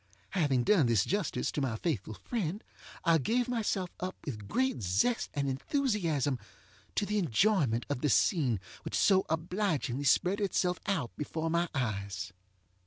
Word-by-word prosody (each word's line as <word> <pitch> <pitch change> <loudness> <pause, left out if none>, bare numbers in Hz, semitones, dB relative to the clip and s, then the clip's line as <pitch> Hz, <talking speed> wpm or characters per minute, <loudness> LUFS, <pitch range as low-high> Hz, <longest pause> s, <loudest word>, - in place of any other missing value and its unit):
Having 145 -9 +2
done 160 - +4
this 115 -4 +3
justice 200 -3 -1
to 145 - -2
my 130 -5 0
faithful 110 - -2
friend, 205 - -3 0.4
I 165 -1 +5
gave 240 - +1
myself 210 -7 -1
up 185 +1 -3
with 105 -8 -5
great 260 - 0
zest 100 - +1
and 140 -1 0
enthusiasm 155 - 0 0.6
to 205 - +1
the 210 +1 0
enjoyment 145 - +2
of 145 -3 -2
the 150 - +2
scene 130 - +3 0.2
which - - -4
so 190 -1 +4
obligingly 160 - -1
spread 190 +8 +3
itself 180 -2 +1
out 165 - -1
before 160 +2 -2
my 170 +1 +1
eyes. 100 -7 -2
160 Hz, 150 wpm, -31 LUFS, 125-195 Hz, 0.6 s, I